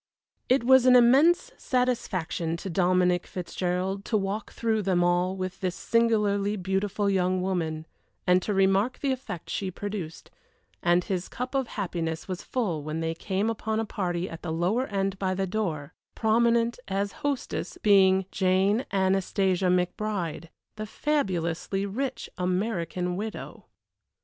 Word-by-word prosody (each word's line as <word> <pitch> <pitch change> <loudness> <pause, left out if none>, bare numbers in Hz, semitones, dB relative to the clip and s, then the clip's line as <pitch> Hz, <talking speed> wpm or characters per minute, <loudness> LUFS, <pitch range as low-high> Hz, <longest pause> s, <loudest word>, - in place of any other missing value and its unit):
It 255 -1 +4
was 260 +1 +6
an 250 - +8
immense 290 - +5
satisfaction 190 -10 -1
to 190 +2 -6
Dominic 180 0 +2
Fitzgerald 185 +2 -2
to 220 - +1
walk 200 +1 -3
through 220 -2 0
them 185 -3 +2
all 175 +1 +2
with 185 -1 -5
this 185 -2 -2
singularly 210 -3 +1
beautiful 195 +2 -1
young 185 -1 +2
woman, 165 -4 -2 0.4
and 180 +1 +4
to 210 - -3
remark 195 +4 +2
the 275 - -1
effect 255 -10 -5
she 195 - -2
produced, 185 -3 -6 0.5
and 175 -1 +3
his 185 -1 -3
cup 250 +2 -5
of 270 -2 0
happiness 165 -5 -3
was 185 -1 -4
full 195 -12 -2
when 155 +2 -4
they 165 0 -1
came 195 +5 -2
upon 220 -1 -1
a 225 - -1
party 180 -4 -2
at 165 - -8
the 170 - -4
lower 185 +11 0
end 195 -1 -2
by 185 -1 0
the 195 +1 0
door; 175 -8 -3 0.2
prominent, 235 +1 +2
as 200 +1 -1
hostess, 285 -2 -3
being 190 -2 +5
Jane 195 +5 +2
Anastasia 190 -1 +1
McBride 180 -2 -1 0.3
the 215 0 -5
fabulously 195 - -1
rich 260 +6 -3
American 180 -1 -1
widow. 215 +2 -6
195 Hz, 145 wpm, -27 LUFS, 180-220 Hz, 0.5 s, an